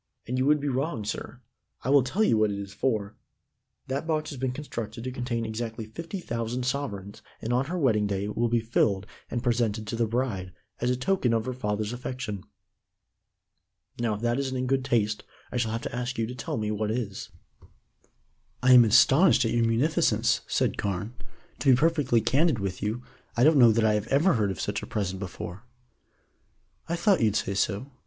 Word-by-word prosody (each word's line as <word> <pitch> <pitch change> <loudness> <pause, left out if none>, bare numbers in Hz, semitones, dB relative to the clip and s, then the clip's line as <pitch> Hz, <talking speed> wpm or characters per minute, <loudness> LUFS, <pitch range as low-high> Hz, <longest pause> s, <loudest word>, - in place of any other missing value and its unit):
"And 125 - -2
you 130 - +2
would 150 0 +4
be 145 - -3
wrong, 130 -4 -1
sir. 110 - -5 0.4
I 130 - 0
will 140 -1 +7
tell 145 - 0
you 120 - +4
what 110 -1 +3
it 100 - -3
is 100 -1 -7
for. 110 -5 -1 0.7
That 140 +4 -3
box 155 -1 -1
has 140 - -7
been 130 0 0
constructed 115 -5 -6
to 130 - -3
contain 120 -2 -2
exactly 110 0 -4
fifty 165 - -6
thousand 120 -4 -3
sovereigns 110 -6 -3 0.2
and 120 - -2
on 125 +2 +2
her 175 +6 -3
wedding 110 -9 +2
day 100 -1 -2
it 105 +1 -4
will 120 0 +1
be 120 0 +2
filled, 105 -4 +1 0.2
and 120 -1 -3
presented 115 -3 0
to 105 - -4
the 115 0 +1
bride, 110 -6 -2 0.3
as 120 - 0
a 125 - +2
token 130 -3 +1
of 110 -1 0
her 130 - -2
father's 105 -2 -2
affection. 125 -5 -5 1.6
Now, 115 -3 0
if 105 - -8
that 120 +2 +1
isn't 130 -1 -2
in 130 - -1
good 135 0 +1
taste, 110 -5 0 0.3
I - - -2
shall 115 -2 0
have 115 +1 -3
to - - -4
ask 125 +1 -3
you 115 - +1
to 120 - -6
tell 125 -2 -4
me 105 -1 -1
what 105 0 -1
is." 110 -4 -3 1.3
"I 130 0 +7
am 125 -1 +9
astonished 130 - +5
at 115 - 0
your 120 -1 +2
munificence," 125 +8 +2
said - - 0
Carne. 100 +3 -2 0.5
"To 140 - +2
be 130 - +8
perfectly 145 -6 +2
candid 150 +2 +2
with 100 -3 -4
you, 110 +4 -2 0.3
I 120 - +4
don't 150 0 +6
know 120 -2 +8
that 110 0 +2
I 110 - +4
have 105 +1 -1
ever 155 +8 +3
heard 105 -3 +1
of 95 - -4
such 105 +1 -2
a - - -7
present 95 -3 -2
before." 95 0 -6 1.3
"I 170 - +1
thought 175 -1 +3
you'd 110 -2 +2
say 100 -2 0
so. 105 +7 -1
120 Hz, 205 wpm, -27 LUFS, 105-130 Hz, 1.6 s, am